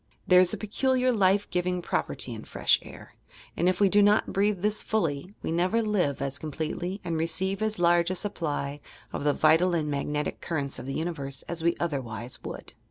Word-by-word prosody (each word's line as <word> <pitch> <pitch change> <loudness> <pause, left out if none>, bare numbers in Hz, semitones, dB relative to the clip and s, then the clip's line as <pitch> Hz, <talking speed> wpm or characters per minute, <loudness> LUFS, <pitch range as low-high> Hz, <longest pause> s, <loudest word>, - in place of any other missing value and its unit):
There 180 -1 +6
is 185 - +3
a - - -2
peculiar 255 +4 +1
life 200 -2 +3
giving 180 0 0
property 175 - -2
in - - -8
fre - - -9
sh - - +6
air, - - -12 0.4
and 175 +2 +2
if 185 - -1
we 200 - +5
do 205 +2 +4
not 205 +1 +3
breathe 200 -1 +1
this 210 0 +1
fully, 180 -2 -2
we - - -2
never 185 +7 +1
live 180 -11 0
as 140 +1 -3
completely 160 +5 -4
and 165 -2 -2
receive 190 +5 0
as 215 0 0
large 175 0 +4
a 185 - -1
supply 150 -7 -3 0.3
of - - -3
the 145 - +4
vital 165 +4 +4
and 150 -3 -1
magnetic 145 +1 -2
currents 145 -5 -3
of - - -8
the 135 - -3
nniverse 145 -5 -4
as 170 -1 -4
we 170 +1 +2
otherwise 125 -7 -4
would. - - -7
175 Hz, 200 wpm, -27 LUFS, 150-195 Hz, 0.4 s, There